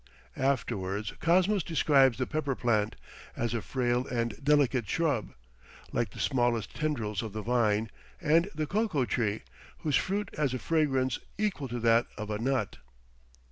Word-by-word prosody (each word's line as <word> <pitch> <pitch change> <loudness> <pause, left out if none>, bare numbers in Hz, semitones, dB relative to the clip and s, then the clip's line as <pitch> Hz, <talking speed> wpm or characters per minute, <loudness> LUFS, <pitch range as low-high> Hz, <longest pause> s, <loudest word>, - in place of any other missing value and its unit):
Afterwards, 105 -6 -1
Cosmos 185 +4 +3
describes 140 -6 +3
the 130 - 0
pepper 145 -2 -2
plant, 110 -4 +1 0.4
as 120 0 -1
a 115 - -1
frail 125 0 0
and 115 -2 -1
delicate 135 -6 +3
shrub, 145 - 0 0.6
like 115 - 0
the - - -12
smallest 120 -4 +1
tendrils 115 -10 -1
of 110 -3 -6
the 110 0 -4
vine, 110 -2 +1 0.3
and 165 +5 +3
the 155 0 -1
cocoa 195 - 0
tree, 110 -3 -1 0.4
whose 150 -3 +2
fruit 200 +1 -2
has 145 -4 0
a - - 0
fragrance 135 -4 +1 0.2
"equal 200 -10 -1
to 120 0 -4
that 115 0 +4
of 105 -1 -5
a 105 - -2
nut." 130 +2 -1
130 Hz, 150 wpm, -29 LUFS, 115-150 Hz, 0.6 s, that